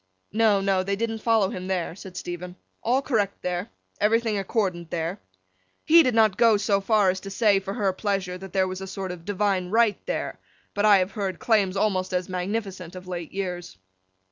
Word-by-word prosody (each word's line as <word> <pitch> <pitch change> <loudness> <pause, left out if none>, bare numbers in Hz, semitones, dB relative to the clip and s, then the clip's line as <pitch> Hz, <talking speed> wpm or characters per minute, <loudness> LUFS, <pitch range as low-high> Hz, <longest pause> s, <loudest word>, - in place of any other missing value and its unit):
No, 215 -2 +3
no; 195 -1 +2
they 200 +1 -1
didn't 225 +1 -2
follow 220 -4 +2
him 185 0 -6
there, 180 -3 -2
said 190 -1 -10
Stephen. 180 +1 -6 0.3
All 255 +4 +1
correct 210 -7 -1
there. 180 +4 -2 0.3
Everything 225 +1 +2
accordant 190 -4 -1
there. 170 +4 -3 0.7
(He 330 +2 +8
did 255 -6 +1
not 220 -4 +4
go 230 -3 +5
so 200 -1 +1
far 205 -2 +3
as 190 - -5
to 195 - -8
say, 200 0 +3
for 195 +1 -5
her 195 -2 +1
pleasure, 195 -2 -2
that 190 0 -9
there 190 -1 +2
was 185 0 -5
a 190 - -5
sort 190 -1 -5
of 170 -2 -9
Divine 195 -2 0
Right 225 0 +2
there; - - -3 0.3
but, 205 +1 +1
I 205 -2 +7
have 185 +1 0
heard 195 -5 -3
claims 200 -4 +2
almost 190 -3 0
as 180 0 0
magnificent 185 -1 -4
of 185 0 -9
late 175 -3 -5
years.) 180 - -5
195 Hz, 195 wpm, -25 LUFS, 185-215 Hz, 0.7 s, He